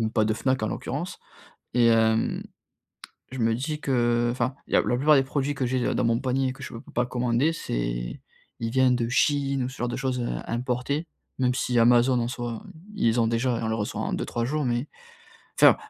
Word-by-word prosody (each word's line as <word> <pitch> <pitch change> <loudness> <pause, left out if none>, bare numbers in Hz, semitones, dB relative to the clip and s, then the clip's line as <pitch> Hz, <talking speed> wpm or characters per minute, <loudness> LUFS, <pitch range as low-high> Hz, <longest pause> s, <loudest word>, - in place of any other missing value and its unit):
même 110 - 0
pas 110 -1 +2
de 110 - +1
Fnac, 130 0 0
en 110 - 0
l'occurrence. - - -4 0.5
Et 120 -1 +4
hem, 110 -1 +3 0.9
je 130 - -6
me 115 0 +2
dis 150 +6 -3
que, 120 -4 +1
enfin, 125 +2 -1
il - - -7
y - - +5
a - - +6
la 120 - 0
plupart 150 +3 +5
des 135 - +4
produits 140 +2 -1
que 135 -2 -2
j'ai 130 -1 0
dans - - 0
mon 115 0 +2
panier 130 0 0
que 135 +2 -10
je - - -7
peux 115 - -7
pas 120 +1 +1
commander, 125 +5 +1
c'est - - -3 0.4
il 115 - -1
viennent 130 -1 +4
de 120 -1 -1
Chine 140 +1 +1
ou 125 - -2
ce 130 - -11
genre 120 - -1
de 120 - -3
choses, 130 -2 -2
heu, 120 - -2 0.2
importées. 125 +6 -2 0.3
Même 125 -1 +2
si 125 -1 0
Amazon, 120 +2 +5
en 120 - -1
soit, 120 -2 -5 0.3
ils 115 - +2
ont 115 - +2
déjà 115 +1 0
et - - -4
on 110 - -1
le 110 - 0
reçoit 105 -2 -3
en - - -2
2-3 120 - -2
jours. 150 +2 -1
Mais 120 +3 -1 0.7
enfin, - - +8
125 Hz, 225 wpm, -26 LUFS, 115-130 Hz, 0.9 s, enfin